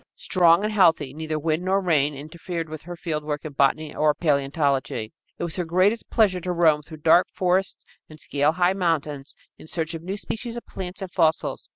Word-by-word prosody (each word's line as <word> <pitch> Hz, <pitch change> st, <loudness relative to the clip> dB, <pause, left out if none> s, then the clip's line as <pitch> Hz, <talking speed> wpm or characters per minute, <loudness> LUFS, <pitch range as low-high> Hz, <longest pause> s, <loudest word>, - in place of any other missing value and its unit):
Strong 175 Hz, 0 st, +3 dB
and 215 Hz, 0 st, -1 dB
healthy, 165 Hz, -9 st, +3 dB
neither 155 Hz, 0 st, -3 dB
wind 155 Hz, +2 st, -1 dB
nor 190 Hz, +2 st, +1 dB
rain 150 Hz, -6 st, +1 dB
interfered 165 Hz, +3 st, -6 dB
with 155 Hz, -1 st, -8 dB
her 175 Hz, +1 st, -8 dB
fieldwork 150 Hz, -3 st, -4 dB
in 155 Hz, -, -6 dB
botany 145 Hz, +3 st, +1 dB
or 150 Hz, -1 st, +2 dB
paleontology. 140 Hz, -6 st, 0 dB, 0.2 s
It -, -, -5 dB
was 170 Hz, 0 st, -4 dB
her 180 Hz, -, 0 dB
greatest 185 Hz, +7 st, +1 dB
pleasure 205 Hz, -5 st, +3 dB
to 180 Hz, +1 st, -3 dB
roam 165 Hz, -4 st, +3 dB
through 155 Hz, +1 st, -12 dB
dark 170 Hz, +2 st, +5 dB
forests 185 Hz, +1 st, -1 dB, 0.2 s
and 155 Hz, 0 st, -13 dB
scale 145 Hz, +1 st, +1 dB
high 180 Hz, +1 st, +2 dB
mountains 155 Hz, -6 st, -2 dB, 0.2 s
in -, -, -13 dB
search 160 Hz, 0 st, -3 dB
of 165 Hz, -, -6 dB
new 190 Hz, +4 st, -4 dB
species 230 Hz, +3 st, -5 dB
of 240 Hz, -, -8 dB
plants 185 Hz, 0 st, -6 dB
and 185 Hz, -, -7 dB
fossils. 160 Hz, -4 st, 0 dB
165 Hz, 195 wpm, -24 LUFS, 150-180 Hz, 0.2 s, dark